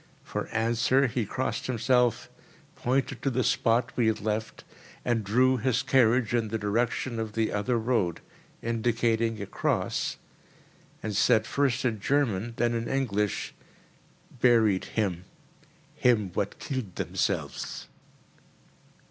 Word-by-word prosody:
For - - -4
answer 120 +4 +2
he 120 -3 -1
crossed 130 0 -2
himself, 125 -1 +2 0.5
pointed 130 0 -1
to 140 - +1
the 130 0 0
spot 115 +2 +2
we 120 -3 +2
had 110 - +1
left 110 +1 -3 0.4
and 120 -3 +1
drew 130 +6 +3
his 125 +1 +1
carriage 120 -2 +3
in 115 -2 +1
the 110 +2 -2
direction 115 +3 -1
of 110 -1 -4
the 110 0 0
other 110 +4 0
road, 110 -7 0 0.4
indicating 115 -1 0
a 100 - -4
cross, - - -1 0.9
and 105 -1 -3
said, 110 +3 +4
first 140 -1 0
in 110 -4 0
German, 115 -3 0
then 120 0 +1
in 115 0 -2
English: 105 -7 -1 0.9
"Buried 110 -6 +4
him—him 100 +2 -2
what 100 +2 -2
killed 130 -10 -5
themselves." - - -2
115 Hz, 120 wpm, -28 LUFS, 110-125 Hz, 0.9 s, said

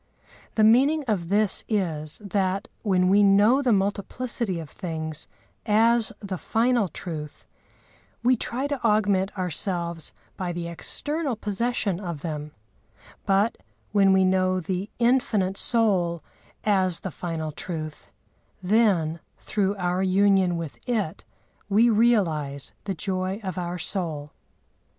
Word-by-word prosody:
The 220 - +3
meaning 275 +8 +5
of 180 -7 -1
this 205 0 +2
is, 160 -8 -1
that, 195 0 -1
when 185 -4 +2
we 200 +2 +5
know 205 +7 +5
the 255 -3 +2
multiplicity 200 0 -1
of 160 - -7
things 160 -1 -5 0.4
as 225 +1 +3
the 195 -4 -5
final 235 -2 +1
truth, 155 -2 -7 0.8
we 255 +1 +5
try 250 +3 -2
to 285 -3 -3
augment 205 -3 +2
ourselves 170 -2 -2 0.3
by 180 -2 -3
the 170 0 -4
external 290 - -1
possession 210 -2 -1
of 170 -7 -5
them; 150 -2 -4 0.8
but, 200 +3 +2 0.3
when 195 -2 +4
we 190 0 +4
know 185 0 +2
the 185 +3 -3
Infinite 235 -6 +2
Soul 185 - +2 0.4
as 190 -4 +2
the 190 - -5
final 160 -3 -4
truth, 155 -1 -6 0.5
then 180 -6 +2 0.2
through 200 -1 -1
our 180 -1 -1
union 190 -2 +3
with 165 -4 -6
it 210 -9 -1 0.5
we 225 +4 +4
realise 165 - +1
the 195 -2 -2
joy 185 +2 -2
of 185 -3 -4
our 175 0 -3
soul. 160 -5 -2
190 Hz, 125 wpm, -25 LUFS, 170-215 Hz, 0.8 s, meaning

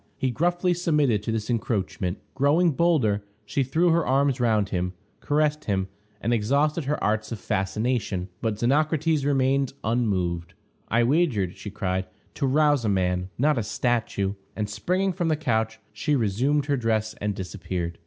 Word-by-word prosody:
He 130 - 0
gruffly 175 +6 +1
submitted 150 - +2
to 110 - -3
this 110 -1 -2
encroachment. 100 -5 -1 0.2
Growing 155 +6 +3
bolder, 135 -11 +2 0.2
she 105 +7 0
threw 165 +7 +2
her 165 0 +3
arms 135 -1 +2
round 110 -4 +2
him, 90 -1 -2 0.3
caressed 150 +1 0
him, 95 -2 -1 0.3
and 115 +3 0
exhausted 140 +8 +1
her 150 +2 -1
arts 110 +2 0
of 115 - -3
fascination, 100 -1 -1
but 110 -2 -1
Xenocrates 155 +5 +2
remained 135 -1 +2
unmoved. 95 -8 -1 0.3
"I 120 +1 +3
wagered," 120 - +1
she 105 - -7
cried, 95 -2 -2 0.3
"to 140 - -1
rouse 145 -1 +3
a 110 - +1
man, 90 -1 0
not 145 0 +2
a - - -1
statue;" 105 -3 0 0.2
and, 105 -1 -2
springing 180 - 0
from 175 -1 -1
the 160 - +2
couch, 110 -7 -1
she 145 +8 0
resumed 130 +6 +1
her 145 -1 +1
dress 110 -2 0
and 105 -1 -1
disappeared. 90 -2 -4
120 Hz, 160 wpm, -25 LUFS, 105-145 Hz, 0.3 s, Growing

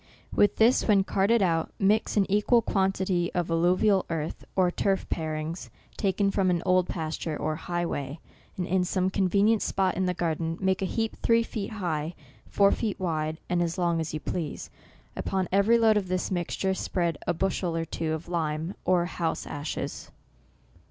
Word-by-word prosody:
With 205 -1 +3
this, 230 +3 +4
when 200 -3 +5
carted 200 +3 +2
out, 165 -3 +1
mix 210 +2 +2
an 200 - +4
equal 210 +4 +3
quantity 190 -3 0
of 175 -2 -1
alluvial 185 +4 +3
earth, 160 -2 -3
or 185 -2 +3
turf 195 +1 0
parings, 160 +1 -3 0.3
taken 195 0 +1
from 195 -2 +1
an 175 -1 0
old 185 -1 +3
pas 160 -2 -3
ture, 155 -3 -4
or 155 - -2
highway, 160 -4 -3 0.4
and 180 - -1
in 185 +1 +1
some 185 +1 0
convenient 200 +3 +3
spot 190 -1 +1
in 185 0 0
the 180 - 0
garden, 165 -1 -1
make 190 -1 +1
a - - +1
heap 225 +3 -2
three 230 0 +4
feet 220 -1 -5
high, 170 -5 -3 0.3
four 200 -1 +4
feet 215 -4 -2
wide, 160 -3 -1
and 175 -1 +1
as 170 +1 -1
long 170 -2 +1
as 160 - -4
you 155 - -3
please. 160 -1 -4 0.4
Upon 190 -2 -1
every 200 +5 +4
load 220 -2 +4
of 195 -3 -1
this 185 +1 -2
mixture, 185 +2 -1
spread 170 -4 -1
a - - +2
bushel 180 -1 -1
or 165 - -1
two 160 -1 -3
of 160 +2 -5
lime, 160 0 -2
or 180 -2 +3
house 170 -2 -2
ashes. 145 +1 -5
180 Hz, 180 wpm, -27 LUFS, 165-195 Hz, 0.4 s, when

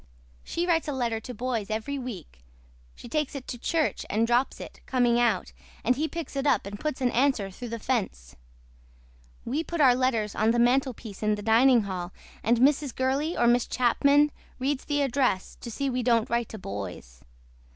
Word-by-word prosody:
SHE 340 - -2
WRITES 330 -3 +1
A 295 - -1
LETTER 235 -4 -1
TO 250 +3 -8
BOYS 230 -3 -2
EVERY 225 +6 -3
WEEK 195 - -8 0.6
SHE - - -11
TAKES 300 +3 -2
IT 265 -2 -7
TO 245 - -5
CHURCH 320 +4 0
AND 220 +3 +2
DROPS 240 +3 +1
IT - - -9
COMING 240 -2 +2
OUT 230 -6 +1 0.3
AND 250 - +3
HE 305 +4 -1
PICKS 330 -4 -6
IT 275 +1 0
UP 240 -9 +2
AND 205 +1 -7
PUTS 305 -3 -3
AN 250 -1 +2
ANSWER 240 -6 +1
THROUGH 240 +5 -8
THE 230 - -4
FENCE. 205 - -3 1.1
WE 285 +7 -1
PUT 340 0 -5
OUR 265 -4 +7
LETTERS 245 -5 0
ON 215 +1 +2
THE 235 - +2
MANTLEPIECE 240 -4 +1
IN 215 -1 +2
THE 205 - -8
DINING 235 +2 +5
HALL 185 -2 -5 0.3
AND 235 +2 +2
MRS. 275 +1 +2
GURLEY 275 +6 0
OR 240 - +3
MISS 240 0 +3
CHAPMAN 280 +4 +3 0.3
READ 270 +1 0
THE 290 0 -1
ADRESS 255 -8 0
TO 235 - -6
SEE 275 +5 -2
WE 250 0 -1
DON'T 230 -2 +2
WRITE 235 -1 0
TO 220 - -7
BOYS. 95 - -7
245 Hz, 195 wpm, -27 LUFS, 220-275 Hz, 1.1 s, OUR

